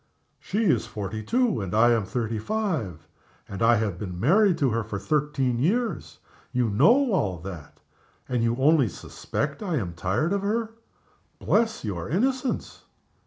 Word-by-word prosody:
"She 215 +3 -2
is 185 - +2
forty 105 +1 -5
two, 235 - +1
and 95 0 -4
I 120 +2 +5
am 115 -4 +1
thirty 115 +1 -2
five; 135 - -3 0.4
and 100 - -7
I 115 +1 +5
have 105 -5 -2
been 90 -4 -6
married 185 - +4
to 135 -4 +1
her 115 0 0
for 105 -1 -5
thirteen 135 +2 0
years. 220 - -1 0.3
You 125 -3 0
know 235 - +4
all 100 - 0
that 85 -5 -9 0.5
and 125 -2 -1
you 115 0 +1
only 135 -1 +3
suspect 140 - -5
I 185 -6 -2
am 95 - -2
tired 95 - -1
of 200 - 0
her. 220 +3 -1 0.7
Bless 220 - 0
your 90 -4 -4
innocence! 255 - -1
125 Hz, 160 wpm, -25 LUFS, -, 0.7 s, I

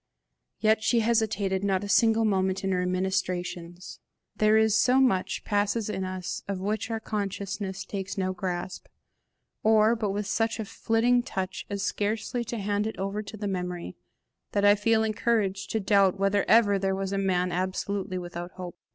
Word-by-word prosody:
Yet 215 0 +3
she 230 +1 +2
hesitated 215 -4 +1
not 195 -1 +1
a - - -4
single 225 +1 +4
moment 190 -2 +1
in 195 - 0
her 180 -1 0
ministrations. 180 -1 -3 0.4
There 215 0 +4
is 220 -1 +4
so 250 +4 +4
much 240 -9 +1
passes 205 +1 0
in 190 - -3
us 185 -1 -4
of 200 -1 -2
which 210 +3 -2
our 225 -1 -2
consciousness 200 -2 -4
takes 195 -1 -5
no 185 -1 0
grasp, 180 0 -4 0.7
or 220 +1 +4
but 220 -3 -2
with 205 +1 -2
such 225 +2 0
a 220 - -2
flitting 235 +4 +2
touch 190 -5 -4
as 200 -1 -3
scarcely 220 +3 -1
to 235 - -4
hand 205 +1 -1
it 220 - -6
over 195 +2 -2
to 215 +1 -9
the 205 0 -3
memory 180 - -4 0.6
that 200 0 +2
I 205 - +8
feel 220 +2 +2
encouraged 210 -3 0
to 220 - 0
doubt 195 -2 +3
whether 195 0 +2
ever 205 -3 +5
there 190 0 0
was 195 0 -3
a 195 - 0
man 180 -2 +1
absolutely 185 +1 -2
without 175 0 -6
hope. 180 -2 -8
200 Hz, 175 wpm, -27 LUFS, 190-215 Hz, 0.7 s, I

